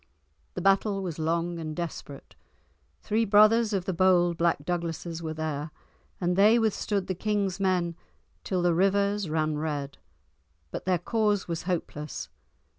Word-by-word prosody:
The 180 - -3
battle 195 0 +2
was 170 -4 -5
long 170 +2 -1
and 155 -1 -5
desperate; 160 -4 -7 0.7
three 220 +2 +1
brothers 215 +2 +5
of 190 -3 -1
the 190 - -1
bold 175 -1 +3
black 165 -3 0
Douglases 170 -1 -3
were 160 -1 -4
there, 155 -1 -3 0.5
and 180 0 0
they 210 +4 +6
withstood 210 -3 0
the 190 - -2
king's 200 0 -1
men 180 -3 +1 0.5
till 185 -2 -1
the 175 -1 +3
rivers 200 +1 +1
ran 155 -1 0
red; 145 -3 -4 0.7
but - - -6
their 185 -1 +2
cause 210 +2 0
was 170 0 -4
hopeless. 150 - -4
175 Hz, 145 wpm, -27 LUFS, 165-200 Hz, 0.7 s, they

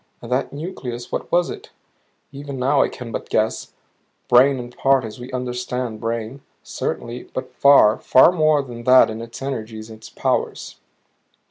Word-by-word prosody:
And 120 - -10
that 130 +2 0
nucleus, 130 -6 -7
what - - -4
was 175 0 +2
it? - - -10 0.6
Even 140 0 -7
now 135 +2 +2
I - - +2
can 120 -2 -9
but - - -6
guess 110 +1 -1 0.6
brain 130 +3 +5
in 120 -1 -7
part 135 0 +2
as 110 +2 -9
we 125 +2 -9
understand 125 -2 -4
brain, 115 +3 -4 0.2
certainly; 120 +1 -5
but 130 - -5
far, 140 -6 +5
far 130 +6 +6
more 155 -4 +2
than 120 -3 -10
that 130 -2 +6
in 110 +1 -6
its 115 +3 -9
energies, 110 -4 -5
its 110 0 -12
powers. - - -2
125 Hz, 160 wpm, -21 LUFS, 115-135 Hz, 0.6 s, far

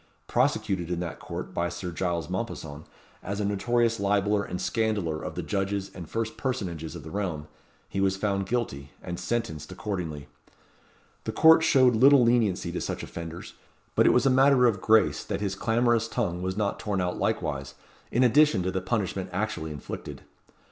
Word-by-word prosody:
Prosecuted 90 -4 0
in 90 -1 -1
that 85 -2 -5
court - - -6
by 85 0 0
Sir 90 0 -5
Giles 85 -2 -2
Mompesson, 85 -6 -5 0.4
as 100 +2 -4
a 105 - 0
notorious 115 +3 +1
libeller 100 +1 +2
and 90 - -5
scandaller 105 -9 -1
of - - -5
the - - -3
judges 100 -1 -2
and 85 -4 -9
first 115 -1 -3
personages 90 - -3
of 80 - -8
the 80 - -9
realm, 90 -7 -3 0.4
he 95 - -2
was 95 0 +2
found 100 -1 -1
guilty, 75 - -3
and 90 -1 -5
sentenced 110 -11 -3
accordingly. 85 -9 -4 1.0
The - - -1
court 160 0 +7
showed 130 -6 +5
little 135 +3 +7
leniency 110 -7 +2
to 90 - -3
such - - -4
offenders; 85 0 -7 0.4
but - - +4
it - - +7
was 125 - +3
a 135 - +5
matter 130 -1 +5
of 105 -6 +2
grace 110 -1 +3
that - - -3
his 100 -2 -2
clamorous 115 +2 +1
tongue 90 -8 -2
was 95 +1 -3
not 105 -2 -1
torn 105 -3 -2
out 90 -1 -2
likewise, 70 -1 -2 0.4
in 125 - +3
addition 125 -5 +4
to 95 - -1
the 95 0 -2
punishment 95 -3 -2
actually 90 -4 -2
inflicted. 75 -3 -7
100 Hz, 175 wpm, -27 LUFS, 85-115 Hz, 1.0 s, court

